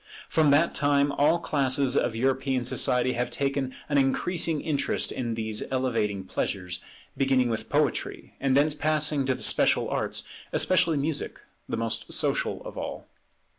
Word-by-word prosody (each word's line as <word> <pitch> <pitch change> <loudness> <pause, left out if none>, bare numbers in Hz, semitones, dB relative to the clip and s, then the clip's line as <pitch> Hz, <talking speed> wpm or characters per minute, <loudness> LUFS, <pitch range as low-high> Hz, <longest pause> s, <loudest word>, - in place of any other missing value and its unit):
From 155 -2 +3
that 150 +4 +3
time 145 0 +2
all 150 +4 +3
classes 135 -4 +1
of 120 -4 +1
European 130 +1 0
society 125 0 +1
have 125 +1 -2
taken 135 -1 -2 0.2
an 145 -1 +2
increasing 160 +4 +1
interest 145 -1 0
in 120 -3 -3
these 110 -1 -3
elevating 115 -7 -1
pleasures, 90 -1 -4 0.4
beginning 135 -2 +2
with 110 - -4
poetry, - - -1
and 135 -1 +1
thence 145 +2 +4
passing 150 -2 +1
to 130 - +1
the - - -8
special - - +3
arts, - - -1 0.3
especially 180 -4 +3
music, 145 +2 -3 0.3
the - - -2
most 115 0 -3
social - - 0
of - - -7
all. - - -7
135 Hz, 150 wpm, -26 LUFS, 125-145 Hz, 0.4 s, thence